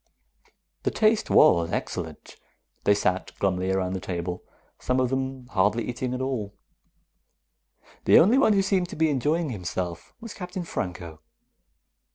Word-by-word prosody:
The - - 0
taste 220 0 +2
was 85 - +5
excellent. - - -5 0.5
They 100 - +5
sat 95 -2 -1
glumly 95 -1 0
around 95 -1 0
the 95 - -2
table, 90 0 -4 0.4
some 125 0 0
of 130 -1 +1
them 130 -1 -3
hardly 105 +5 +1
eating 125 +1 -3
at 125 - -4
all. 120 -7 -3 1.5
The - - +7
only 225 +10 +6
one 220 -6 +4
who 195 -1 +3
seemed 190 -2 0
to - - -7
be 160 0 +2
enjoying 150 +3 0
himself 90 -4 -5
was 230 -2 -8
Captain 180 0 -6
Franco. 85 - -5
125 Hz, 145 wpm, -26 LUFS, -, 1.5 s, The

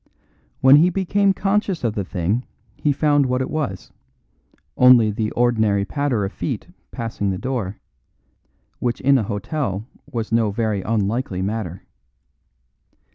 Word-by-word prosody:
When 135 +2 +8
he 170 +4 +5
became 195 +2 +1
conscious 195 -3 0
of 115 -3 0
the 105 -3 -2
thing 95 +6 -1 0.3
he 150 - 0
found 145 -1 +2
what 125 0 0
it 130 - -3
was: 130 - -3 0.8
only 125 -4 +6
the 110 0 -2
ordinary 110 -5 +2
patter 130 -4 -1
of 95 - -4
feet - - -4 0.2
passing 115 -3 -3
the 95 - -1
door, 115 -5 -3 1.0
which 120 -1 -1
in 135 0 +4
an 110 - -2
hotel 105 - -3 0.3
was 115 -3 -3
no 115 -2 +2
very 105 -1 -1
unlikely 105 -2 -1
matter. 100 -3 -4
115 Hz, 135 wpm, -21 LUFS, 100-140 Hz, 1.0 s, When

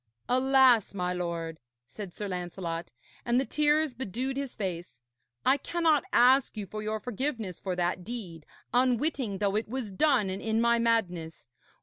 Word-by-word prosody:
'Alas, 255 -4 +4
my 180 -1 -1
lord,' 170 -2 -4 0.3
said 195 - -8
Sir 205 +3 -5
Lancelot, 175 -2 -4 0.3
and 240 +1 +2
the 270 - 0
tears 300 0 +2
bedewed 255 +2 -3
his 275 -2 -4
face, 175 - -5 0.5
'I 265 +2 +5
cannot 320 0 +1
ask 255 0 +4
you 210 - -3
for 215 +3 -6
your 215 0 -2
forgiveness 230 - -3
for 185 -2 -3
that 180 0 -1
deed, 180 -8 -7 0.3
unwitting 250 -3 +1
though 200 0 0
it 215 0 -1
was 245 -4 -4
done 245 0 +3
and 190 +2 -4
in 220 0 0
my 235 0 +3
madness. 175 - -1
220 Hz, 155 wpm, -29 LUFS, 180-260 Hz, 0.5 s, I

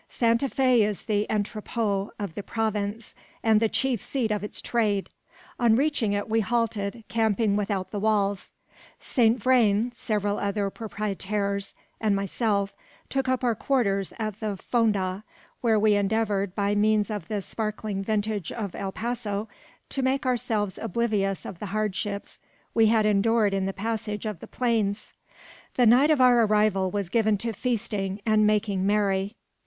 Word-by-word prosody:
Santa 235 +3 +1
Fe 255 -3 +3
is 210 -1 0
the 210 -1 0
entrepot 210 -1 -1
of 200 -6 -4
the 205 - -5
province, 215 0 -2 0.3
and 220 -1 +5
the 225 0 +2
chief 255 -4 0
seat 245 -6 -1
of 210 -1 -1
its 210 - -4
trade. 210 -4 0 0.5
On 235 -3 +4
reaching 265 -6 +1
it 205 0 -1
we 225 0 +2
halted, 225 0 -1
camping 220 -2 +1
without 200 -2 -2
the 205 - -3
walls. 205 -2 0 0.5
Saint 235 -1 +2
Vrain, 235 -2 +3
several 210 -3 -1
other 200 0 -1
proprietaires, 200 -2 -3 0.2
and 215 -2 +2
myself, 200 0 0 0.4
took 270 -1 -1
up 260 0 0
our 240 -2 +3
quarters 200 -6 0
at 215 -2 -4
the 210 -3 -3
Fonda, 205 -4 0 0.4
where 225 -3 +3
we 210 0 +4
endeavoured, 200 -1 0
by 200 -1 +1
means 210 +1 +2
of 205 -6 -4
the 210 +1 -2
sparkling 215 0 -3
vintage 210 -3 -1
of 205 -5 -4
El 195 - -4
Paso, 220 -2 -3 0.4
to 270 - -2
make 265 +2 0
ourselves 220 -5 -1
oblivious 210 -3 -1
of 175 - -7
the 210 - -5
hardships 205 0 -3 0.3
we 225 -1 +5
had 220 -1 +3
endured 210 0 +3
in 195 -1 0
the - - -1
passage 210 +1 -3
of 210 -6 -4
the - - -10
plains. 220 -4 -1 0.6
The 250 - +4
night 250 +6 +6
of 305 -3 +4
our 245 -2 +6
arrival 210 -3 +2
was 200 0 -2
given 215 +2 +2
to 230 +3 -3
feasting 205 -4 -2
and 215 -1 +4
making 205 -3 +1
merry. 200 -1 +1
215 Hz, 160 wpm, -26 LUFS, 200-230 Hz, 0.6 s, night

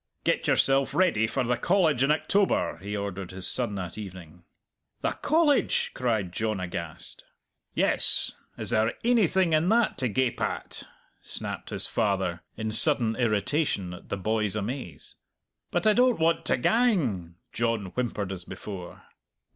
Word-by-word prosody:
"Get - - 0
yourself 135 0 +3
ready 170 - +3
for 130 +3 -1
the 120 0 0
College 160 -2 +2
in 135 - +3
October," 190 - +1
he 100 +4 -5
ordered 100 -2 -5
his 95 0 -4
son 120 -5 0
that 90 +1 -5
evening. 90 -4 -10 0.6
"The - - 0
College!" 305 -2 +2
cried 110 -8 -1
John 110 +1 -2
aghast. 85 -3 -7 0.5
"Yes! - - +3 0.3
Is - - -3
there 110 0 +2
ainything 190 -7 +3
in 155 +3 +3
that 230 +1 +2
to 125 -2 0
gape 125 +3 0
at?" - - -3 0.4
snapped - - -6
his - - +5
father, 95 -5 -1 0.2
in 110 -1 -3
sudden 120 -3 +2
irritation 110 - 0
at 90 - -12
the 100 - -2
boy's 105 +1 -1
amaze. 110 - -6 0.5
"But 175 +2 -1
I 215 - +6
don't 250 +1 +3
want 165 +1 +2
to - - +2
gang!" 125 - +1 0.2
John 115 -5 -1
whimpered 110 -6 -3
as 90 -2 -6
before. 95 -2 -9
115 Hz, 145 wpm, -27 LUFS, 95-155 Hz, 0.6 s, I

